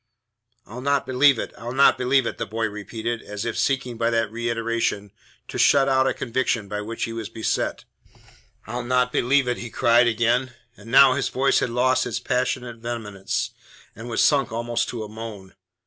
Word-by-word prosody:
"I'll 120 +4 -9
not 140 +1 +1
believe 130 +1 +4
it! - - -5
I'll 120 +1 -6
not 140 +1 +5
believe 130 +1 +2
it!" - - -4
the 115 - -3
boy 115 +2 -2
repeated, 110 +2 -5
as 105 0 -6
if 115 - -2
seeking 130 -4 -1
by 115 0 +2
that 115 -2 0
reiteration 115 -3 -2 0.4
to - - -6
shut 140 -1 +5
out 130 -1 +3
a - - +1
conviction 120 -3 -1
by 105 +1 -4
which 115 +2 -5
he 115 - -3
was 115 -2 -5
beset. 110 -1 -2 0.8
"I'll 120 +2 -4
not 125 0 +1
believe 135 +1 +2
it!" 125 - 0
he 120 - -6
cried 120 +1 +4
again; 120 +2 +1 0.2
and 105 +2 -14
now 135 +1 +7
his 135 +1 -1
voice 135 +1 +2
had - - -1
lost 125 +2 +1
its 120 0 -3
passionate 125 -1 -2
vehemence, 110 -4 -4 0.4
and 115 +3 -8
was 115 - +1
sunk 140 -6 +3
almost 120 +1 -2
to 115 -3 -4
a - - -7
moan. 105 -3 -9
120 Hz, 190 wpm, -23 LUFS, 115-130 Hz, 0.8 s, now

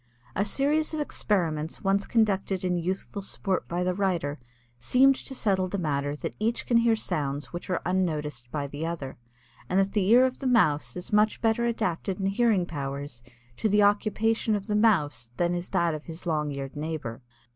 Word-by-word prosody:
A 200 - +1
series 300 +8 +1
of - - -3
experiments 165 - -1
once 195 +1 +1
conducted 195 -4 +1
in 180 -1 +1
youthful 185 +3 -3
sport 195 -1 -2
by 175 +1 -1
the 180 0 +1
writer, 175 -7 -1 0.4
seemed 260 - +5
to 265 - -7
settle 190 -6 +1
the 200 - -3
matter 145 -4 -1
that - - -5
each 225 +2 0
can 235 - +3
hear 230 -1 +4
sounds 145 -8 -3
which 175 - -6
are 180 - -1
unnoticed 150 -9 -1
by 145 +2 -3
the 145 +2 -6
other, 165 -5 -4 0.5
and 185 - +2
that 195 0 +2
the 200 -3 +1
ear 245 +3 +7
of 255 0 -2
the 270 - -2
Mouse 150 - +2
is 180 +3 -6
much 210 +1 +3
better 225 +1 +2
adapted 195 -4 -2
in 195 - -1
hearing 200 -2 +2
powers 140 -5 -5 0.4
to 220 - +1
the 205 +1 +4
occupation 215 +2 +2
of 200 -1 -3
the 210 - -1
Mouse 160 - +2
than 175 0 +1
is 175 0 -4
that 170 -1 +1
of 155 -1 -6
his 165 +1 -9
long 150 -3 0
eared 140 0 -6
neighbor. 150 -6 -4
185 Hz, 190 wpm, -27 LUFS, 150-215 Hz, 0.5 s, ear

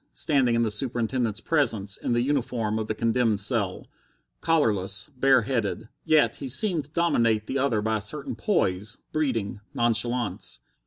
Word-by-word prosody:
Standing 130 -6 +1
in 115 - +2
the 110 - 0
Superintendent's 115 -1 -1
presence 115 -11 0
in - - -2
the 120 0 +2
uniform 120 -5 -1
of 110 - -3
the 110 - -2
condemned 115 -2 +1
cell, 100 -3 0 0.5
collarless, 105 - 0
bare 130 -1 +4
headed, 110 -2 -2
he - - -1
yet 155 - +5
seemed 150 - +1
to - - -19
dominate 115 -11 +1
the 135 +5 -2
other 120 -6 +1
by 110 0 +1
a - - -5
certain 140 +7 -4
poise, 105 - 0 0.2
breeding, 115 -10 -1 0.2
nonchalance. 120 - 0
115 Hz, 155 wpm, -26 LUFS, 110-135 Hz, 0.5 s, yet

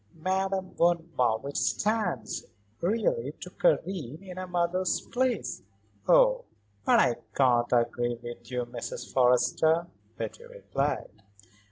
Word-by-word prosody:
Madame 190 +2 -1
von 170 -1 +2
Marwitz 125 +3 +1 0.2
stands, 200 - -1 0.3
really, 230 - 0
to - - -8
Karen 185 - 0
in 185 -2 -9
a 185 - -5
mother's 180 +1 +1
place." 255 0 -1 0.5
"Oh, - - +5 0.4
but - - +5
I 120 - +4 0.2
can't 120 -3 +3
agree 120 0 +1
with 120 0 -9
you, 125 -1 -2
Mrs. 120 -1 -7
Forrester," 135 +6 +3 0.3
Betty 470 - -5
replied. 485 - -3
170 Hz, 115 wpm, -28 LUFS, 125-195 Hz, 0.5 s, Oh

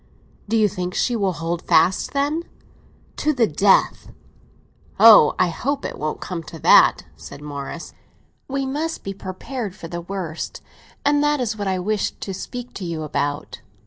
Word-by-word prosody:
"Do 225 - +2
you 215 -1 +4
think 180 -2 -4
she 245 - +1
will 195 -4 0
hold 165 +2 -3
fast, 185 - +2
then?" 290 +3 0 0.8
"To 305 +1 +1
the 245 -4 +3
death!" 195 +2 +2 0.9
"Oh, 220 -9 +8
I 180 - +3
hope 275 - -2
it - - -5
won't 155 +1 -3
come 180 -3 -5
to 165 +1 -10
that," - - +5
said - - -11
Morris. 145 +2 -7 0.5
"We 275 0 -2
must 305 +5 -3
be 195 - -4
prepared 195 +3 -6
for 170 - -9
the 170 +1 -5
worst, 175 -3 -5 0.4
and 290 0 +3
that 295 -1 +2
is 230 -3 -1
what 205 -2 -4
I 190 -1 0
wish 205 +3 -1
to 195 - -5
speak 245 +6 -7
to 195 - -7
you 165 -3 -4
about." 145 -1 -3
195 Hz, 170 wpm, -22 LUFS, 170-250 Hz, 0.9 s, Oh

